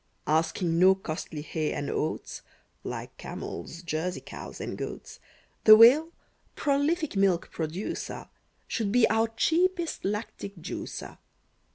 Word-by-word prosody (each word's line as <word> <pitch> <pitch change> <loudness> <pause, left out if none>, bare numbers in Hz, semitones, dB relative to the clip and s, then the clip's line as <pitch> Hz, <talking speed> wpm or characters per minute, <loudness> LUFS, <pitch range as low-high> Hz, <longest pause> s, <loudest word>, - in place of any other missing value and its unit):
Asking 165 +2 +1
no 190 +1 +7
costly 155 -4 -5
hay 155 0 -2
and 145 - -3
oats, 155 - -3 0.4
Like - - -6
camels, 165 - -7
Jersey 170 +2 -2
cows, - - -9
and - - -4
goats, - - -7 0.5
The 215 - +11
Whale, 275 +9 +7 0.4
prolific 295 +1 0
milk 195 -3 +2
producer, 165 +5 -4 0.4
Should 215 -4 -1
be 245 +1 +5
our 225 +1 +3
cheapest 340 +9 0
lactic 205 0 -4
juicer. 165 - -7
195 Hz, 115 wpm, -28 LUFS, 165-245 Hz, 0.5 s, The